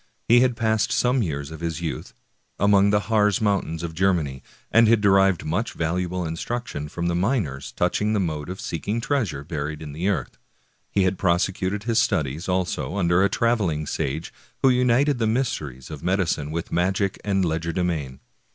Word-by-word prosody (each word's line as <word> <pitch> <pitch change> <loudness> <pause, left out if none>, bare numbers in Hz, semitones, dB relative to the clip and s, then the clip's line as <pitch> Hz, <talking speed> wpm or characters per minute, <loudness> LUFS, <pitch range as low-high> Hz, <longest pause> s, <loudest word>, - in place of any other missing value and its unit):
He 120 +1 +7
had 125 -1 +2
passed 110 -3 +1
some 125 +1 +2
years 70 -6 -3
of 80 - -8
his 85 -1 -3
youth 85 -2 -5 0.4
among 100 0 +4
the 105 0 +3
Harz 105 -2 +2
^ - - -11
mountains 95 -6 0
of 85 -1 -4
Germany, 80 -7 0 0.3
and 115 0 +6
had 115 0 +5
derived 95 -3 +3
much 85 +9 -1
valuable 90 +2 -2
instruction 80 -2 -4
from 85 +2 -4
the 85 - +1
miners 90 - -1
touching 105 +1 0
the 105 - +1
mode 80 -4 -2
of 95 - -6
seeking 100 +8 -3
treasure 115 - -1
buried 75 0 -4
in 75 -2 -8
the 85 +6 -1
earth. 100 - -3 0.5
He 100 - +2
had 95 0 0
prosecuted 95 +2 0
his 115 0 +2
studies, 80 - 0
also, 90 0 -1
under 85 -1 +3
a 100 - +3
traveling 100 -10 0
sage 70 +3 -3 0.3
who 135 - +7
united 125 +2 +3
the 115 - +1
mysteries 80 - -2
of 75 -3 -7
medicine 90 -6 0
with 80 +1 -4
magic 95 +2 0
and 95 -2 +1
legerdemain. 80 -4 -2
90 Hz, 175 wpm, -24 LUFS, 80-105 Hz, 0.5 s, He